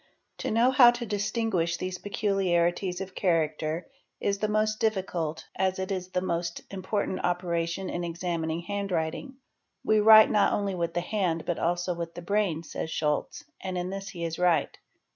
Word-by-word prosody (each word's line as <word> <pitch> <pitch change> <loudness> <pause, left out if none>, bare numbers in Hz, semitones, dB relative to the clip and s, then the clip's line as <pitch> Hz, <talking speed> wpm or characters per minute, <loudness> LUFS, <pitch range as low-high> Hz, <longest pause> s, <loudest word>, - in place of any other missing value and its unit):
To - - -2
know 235 +4 +4
how 255 -2 +8
to 240 0 -2
distinguish 200 -5 0
these 185 0 -4
peculiarities 185 -3 0
of 190 -1 -6
character 160 -2 0 0.3
is 200 0 0
the 215 - 0
most 215 0 +1
difficult 180 -7 -1
as 190 -1 0
it 190 +1 -3
is 185 -2 -2
the 185 0 -2
most 170 -1 -2
important 190 0 -2
operation 175 +1 -1
in 175 - -3
examining 170 -1 -2
hand 200 +2 -4
writing 170 - -2 0.2
:—'' - - -52
We 215 0 +4
write 215 0 +8
not 210 -1 +3
only 200 -1 -1
with 170 -2 -2
the 175 - +1
hand, 175 -4 -1
but 175 - -2
also 175 +1 0
with 170 -1 -6
the 175 - -7
brain," 190 -4 0
says 160 - -5
Scholz, 155 - -1 0.2
and 185 -1 -3
in 180 +1 -3
this 195 0 -5
he 170 -2 -6
is 165 0 -3
right. 175 -5 +2
180 Hz, 180 wpm, -28 LUFS, 170-200 Hz, 0.3 s, how